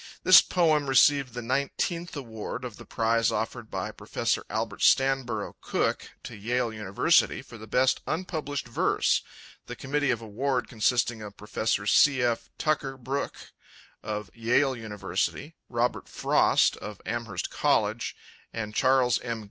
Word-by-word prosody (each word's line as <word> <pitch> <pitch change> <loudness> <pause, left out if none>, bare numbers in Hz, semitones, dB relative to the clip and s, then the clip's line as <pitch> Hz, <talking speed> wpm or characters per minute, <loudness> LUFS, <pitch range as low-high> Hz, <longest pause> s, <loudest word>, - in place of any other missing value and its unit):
This 185 -1 +9
poem 155 -5 +2
received 135 -1 +4
the 120 - -4
nineteenth 140 +8 -2
award 115 -1 -6
of 120 -4 -8
the - - -13
prize 115 0 +1
offered 110 +1 -3
by - - -4
Professor - - -2
Albert - - -3
Stanburrough 130 -5 +2
Cook - - -1
to - - -8
Yale 115 +2 -1
University 105 -3 +2
for 115 - -12
the 110 - -10
best 130 +4 +2
unpublished 155 -4 -3
verse, 120 - +1 0.5
the - - -6
Committee 145 +1 -1
of 120 - +1
Award 120 +3 -2
consisting 120 0 0
of 105 -1 -9
Professors 105 -1 -1
C. 140 -3 +5
F. 120 -1 -1
Tucker 140 -3 -1
Brooke, 135 +3 -5 0.5
of 105 -1 -5
Yale 125 +4 +2
University, 105 -4 -3 0.2
Robert - - -1
Frost, - - +3
of 105 -2 -8
Amherst 115 -5 -4
College, - - 0 0.4
and 105 -2 -5
Charles 130 -1 +3
M. 115 -2 -4
120 Hz, 140 wpm, -27 LUFS, 110-135 Hz, 0.5 s, This